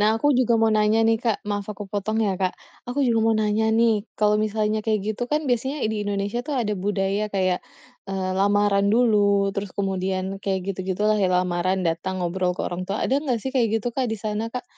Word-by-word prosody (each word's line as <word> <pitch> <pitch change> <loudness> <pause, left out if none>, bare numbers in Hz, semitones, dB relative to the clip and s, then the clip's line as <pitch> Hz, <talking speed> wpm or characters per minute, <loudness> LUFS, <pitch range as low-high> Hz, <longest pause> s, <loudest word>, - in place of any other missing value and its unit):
Nah, 215 +2 +3
aku 290 +6 +1
juga 235 -2 +3
mau 225 0 +3
nanya 215 +1 +3
nih 225 -1 +3
Kak, 225 -3 +1
maaf 205 -1 -2
aku 205 0 -8
potong 205 +2 -1
ya, 195 - +1
Kak. 185 -1 0 0.3
Aku 260 +4 -1
juga 230 -2 +2
mau 225 - +3
nanya 215 +1 +1
nih, 230 -1 +4 0.2
kalau 210 0 +3
misalnya 215 0 0
kayak 215 -1 +1
gitu 220 - -6
kan 300 +1 +2
biasanya 265 +4 0
di - - -2
Indonesia 205 +3 -2
tuh 290 +1 -4
ada 220 -4 0
budaya 200 +1 -1
kayak, 185 -2 +1 0.5
eee, 190 -1 -2
lamaran 200 0 +3
dulu 205 -3 +3
terus 200 0 -3
kemudian 190 0 -2
kayak 190 -1 -1
gitu-gitu 190 +1 -3
lah, 215 0 +3
ya 190 - +3
lamaran 180 +1 0
datang 180 +3 -2
ngobrol 180 +1 -1
ke - - -2
orang 175 +1 -3
tua. 200 - -1
Ada 275 +2 +1
nggak 255 -6 -1
sih 265 - -3
kayak 240 -4 +2
gitu, 245 - -2
Kak, 255 -1 -1
di 220 - -2
sana 215 +2 -3
Kak? 250 +2 -6
205 Hz, 215 wpm, -23 LUFS, 190-225 Hz, 0.5 s, nih